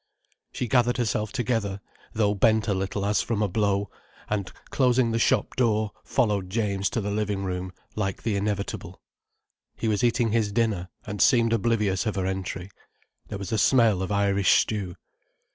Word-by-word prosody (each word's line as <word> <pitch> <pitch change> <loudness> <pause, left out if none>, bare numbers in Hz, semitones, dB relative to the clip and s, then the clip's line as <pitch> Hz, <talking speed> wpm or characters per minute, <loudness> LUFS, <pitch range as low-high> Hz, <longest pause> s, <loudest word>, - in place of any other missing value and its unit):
She 125 - -3
gathered 120 +1 +2
herself 110 -3 -1
together, 115 -6 -1 0.3
though 105 -2 +1
bent 110 +2 +2
a 100 - +2
little 95 +1 -2
as 105 -1 +2
from 110 -2 -1
a - - +2
blow, 100 0 0 0.4
and, 100 -3 -2 0.2
closing 125 -3 +3
the 115 - 0
shop - - +1
door, 110 -4 +1
followed 105 -7 0
James 100 -2 0
to 115 - -2
the 105 0 -3
living 105 -1 -1
room, 90 -1 -3 0.2
like 100 -3 -2
the 110 -2 0
inevitable. 100 0 -3 0.8
He 115 - -3
was 110 +2 +1
eating 120 -1 +2
his 110 -2 +1
dinner, 105 -5 0 0.2
and 105 -1 -4
seemed 115 -3 +4
oblivious 105 -2 +1
of 105 - -1
her 95 -1 -1
entry. 95 0 -4 0.6
There - - -5
was 100 -1 -6
a 110 - +1
smell 115 -7 +4
of 95 - -3
Irish 100 -1 +3
stew. 95 -5 -3
105 Hz, 170 wpm, -26 LUFS, 100-115 Hz, 0.8 s, seemed